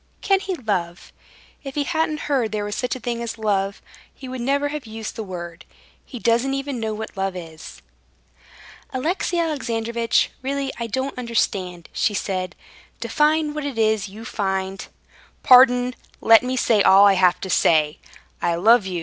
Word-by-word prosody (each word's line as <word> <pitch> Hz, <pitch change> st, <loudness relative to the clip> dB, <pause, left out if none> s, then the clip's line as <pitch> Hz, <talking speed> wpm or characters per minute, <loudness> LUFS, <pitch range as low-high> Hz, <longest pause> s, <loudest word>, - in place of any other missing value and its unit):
Can 390 Hz, -1 st, +3 dB
he 385 Hz, -1 st, -3 dB
love? 185 Hz, -, -3 dB, 0.5 s
If 275 Hz, -2 st, -7 dB
he 295 Hz, -, +1 dB
hadn't 315 Hz, -1 st, -1 dB
heard 260 Hz, -7 st, 0 dB
there 210 Hz, -1 st, -2 dB
was 205 Hz, -, -4 dB
such 250 Hz, 0 st, -2 dB
a -, -, -7 dB
thing 235 Hz, 0 st, -3 dB
as 235 Hz, -1 st, -5 dB
love, 200 Hz, -2 st, -1 dB, 0.3 s
he 265 Hz, -, -11 dB
would 255 Hz, -1 st, -5 dB
never 280 Hz, +3 st, +1 dB
have 295 Hz, -4 st, -6 dB
used 220 Hz, 0 st, -6 dB
the 225 Hz, -, -4 dB
word. 175 Hz, -2 st, -8 dB, 0.4 s
He 255 Hz, -, -9 dB
doesn't 235 Hz, +4 st, +1 dB
even 275 Hz, -2 st, -4 dB
know 220 Hz, -1 st, -2 dB
what 220 Hz, +1 st, -7 dB
love 195 Hz, -1 st, -2 dB
is." 160 Hz, -, -10 dB, 1.1 s
"Alexey 335 Hz, +6 st, -1 dB
Alexandrovitch, 235 Hz, -8 st, 0 dB
really 275 Hz, +1 st, -2 dB
I 235 Hz, -, -3 dB
don't 260 Hz, +5 st, -3 dB
understand," 190 Hz, -7 st, -2 dB
she 210 Hz, -, 0 dB
said. 185 Hz, -2 st, -3 dB, 0.4 s
"Define 300 Hz, +6 st, +1 dB
what 300 Hz, 0 st, -4 dB
it 280 Hz, -4 st, -4 dB
is 220 Hz, -3 st, +1 dB
you 215 Hz, +3 st, -10 dB
find...." 190 Hz, -2 st, -3 dB, 0.6 s
"Pardon, 250 Hz, -1 st, +6 dB, 0.3 s
let 225 Hz, 0 st, +6 dB
me 255 Hz, +1 st, -2 dB
say 225 Hz, -4 st, +3 dB
all 195 Hz, +1 st, +7 dB
I 200 Hz, -, +6 dB
have 185 Hz, -2 st, +3 dB
to 190 Hz, -, -5 dB
say. 155 Hz, -3 st, +3 dB, 0.4 s
I 170 Hz, -1 st, +1 dB
love 215 Hz, +3 st, +4 dB
you. 180 Hz, -2 st, -3 dB
230 Hz, 170 wpm, -22 LUFS, 195-265 Hz, 1.1 s, all